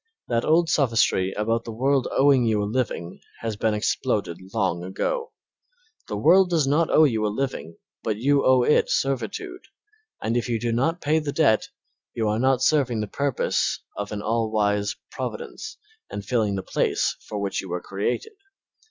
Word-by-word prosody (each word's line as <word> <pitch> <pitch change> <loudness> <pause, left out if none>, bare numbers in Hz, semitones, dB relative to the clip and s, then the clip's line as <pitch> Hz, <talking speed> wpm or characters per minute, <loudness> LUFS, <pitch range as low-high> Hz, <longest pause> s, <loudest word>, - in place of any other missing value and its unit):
That 120 -1 +1
old 165 +2 +3
sophistry 115 -10 +2
about 115 +2 0
the 115 - -7
world 135 +3 +1
owing 135 -2 +4
you 110 -3 +1
a - - -1
living 105 -6 -3 0.2
has 115 -2 -3
been 110 +1 0
exploded 85 -4 -1
long 95 -6 -1
ago. 465 - -3 0.8
The - - -3
world 190 0 +5
does 165 -5 +2
not 150 +4 +2
owe 155 - +5
you 115 -7 +2
a - - +2
living, 105 -7 -3 0.2
but 110 -2 -2
you 140 +5 +2
owe 130 -1 +5
it 150 - +3
servitude, 365 - -2 0.6
and 115 +2 -2
if 120 +1 -1
you 115 -2 0
do 120 +1 -1
not 160 +9 0
pay 155 +2 +2
the 150 -2 -3
debt 140 -9 +2 0.5
you 110 -2 0
are 105 +1 0
not 130 0 +2
serving 130 -6 +2
the - - -1
purpose 140 +3 -1
of 105 0 -5
an 105 -1 -4
all 115 0 0
wise 105 -1 0 0.2
Providence 130 - -6 0.3
and 100 - -6
filling 110 -3 0
the 95 - -3
place - - 0
for 105 - -4
which 100 -1 -2
you 95 - -10
were 90 +1 -2
created. 100 - -3
115 Hz, 180 wpm, -24 LUFS, 105-140 Hz, 0.8 s, world